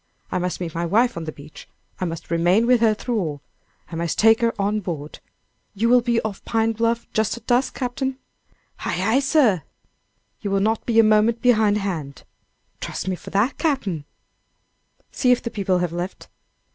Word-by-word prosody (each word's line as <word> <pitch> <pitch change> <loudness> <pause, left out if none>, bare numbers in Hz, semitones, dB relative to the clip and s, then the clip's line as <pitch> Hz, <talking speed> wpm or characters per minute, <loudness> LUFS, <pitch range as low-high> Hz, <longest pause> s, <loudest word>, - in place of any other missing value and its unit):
I - - 0
must 180 0 -2
meet 170 -3 -4
my 170 - -2
wife 230 +8 +2
on 165 - -5
the 155 - -4
beach. 150 0 -13 0.3
I 185 - -1
must 165 -1 -6
remain 175 +7 +3
with 245 -1 +4
her 220 -2 +4
through 235 +1 -2
all. 150 -6 -3 0.5
I - - -5
must 170 -1 -2
take 225 +1 +5
her 230 0 +3
on 205 +2 +1
board. 160 -6 -6 0.6
You 225 +4 +1
will 250 0 +6
be 235 -1 +1
off 215 -3 -5
Pine 225 -1 +1
Bluff 230 +1 0
just 220 +1 0
at 235 - -13
dusk, 250 +1 +1
captain?" 260 +1 -2 0.6
"Ay, - - -2
ay, 220 +8 +3
sir." 270 - +3 0.8
"You 205 - -3
will 195 0 +1
not 220 +3 0
be 230 -2 +1
a 225 - +8
moment 215 +2 +3
behind 220 -4 +4
hand?" 165 -9 -4 0.6
"Trust - - -5
me 185 - 0
for - - -11
that, 210 +7 0
Cap'n." 210 - -1 1.1
"See 250 - +2
if 250 - +2
the 235 - -4
people 190 -3 0
have 175 -2 -1
left." 175 +2 -5
215 Hz, 190 wpm, -22 LUFS, 180-235 Hz, 1.1 s, a